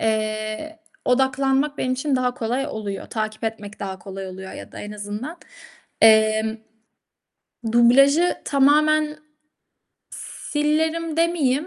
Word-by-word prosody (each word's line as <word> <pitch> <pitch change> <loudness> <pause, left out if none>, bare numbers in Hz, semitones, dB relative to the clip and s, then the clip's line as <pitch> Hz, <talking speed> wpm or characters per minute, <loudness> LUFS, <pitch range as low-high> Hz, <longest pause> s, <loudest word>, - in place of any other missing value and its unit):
eee, 215 +7 -2 0.3
odaklanmak 270 +3 +1
benim 255 - 0
için 265 +2 0
daha 250 -1 0
kolay 250 +4 -2
oluyor. 210 -7 -5
Takip 215 0 -4
etmek 210 -2 -5
daha 190 -1 -5
kolay 195 +1 -7
oluyor 190 +1 -8
ya - - -10
da - - -9
en 210 - -7
azından. 210 +9 -6 0.6
Emm, 220 0 +5 1.2
dublajı 275 +8 +5
tamamen 300 +2 +3 0.9
s - - -9 0.4
silerim 320 +2 0
demeyeyim, 325 -4 +1
250 Hz, 115 wpm, -22 LUFS, 215-295 Hz, 1.2 s, Emm